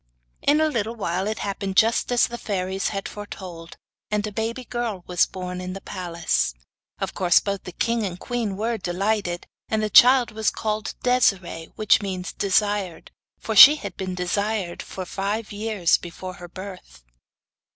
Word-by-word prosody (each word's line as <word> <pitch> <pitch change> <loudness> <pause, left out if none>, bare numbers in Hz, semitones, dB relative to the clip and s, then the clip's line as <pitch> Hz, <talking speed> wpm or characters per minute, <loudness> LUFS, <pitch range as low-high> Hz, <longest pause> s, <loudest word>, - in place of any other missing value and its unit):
In 290 +2 +3
a 315 - +3
little 230 -5 -2
while 190 -2 -2
it 215 0 -2
happened 195 -1 -4
just 225 +2 +3
as 245 - +4
the 240 0 -7
fairies 190 -1 -2
had 195 -1 -3
foretold, 180 -5 -9 0.3
and 210 0 0
a 210 - -4
baby 225 +4 -3
girl 230 -7 -3
was 180 -1 +2
born 180 -1 -6
in 185 0 -5
the 195 - -7
palace. 170 - -1 0.4
Of - - -3
course 175 -2 +4
both 200 -1 -4
the 180 - -6
king 230 +5 0
and 180 -3 -4
queen 225 -5 -3
were 225 +2 -1
delighted, 185 0 -1 0.2
and 215 -1 0
the 210 - -1
child 250 0 +7
was 220 -1 0
called 215 -1 -3
Desiree, 195 -9 +1
which 215 0 +3
means 185 -2 -4
'desired,' 200 -3 0 0.3
for 220 - -4
she 285 +9 +11
had 200 -11 -7
been 185 -1 -4
'desired' 190 0 -2
for 185 - -7
five 205 +5 -3
years 205 -4 +1
before 185 +2 -8
her 180 -1 -10
birth. 185 - -10
200 Hz, 170 wpm, -24 LUFS, 185-220 Hz, 0.4 s, she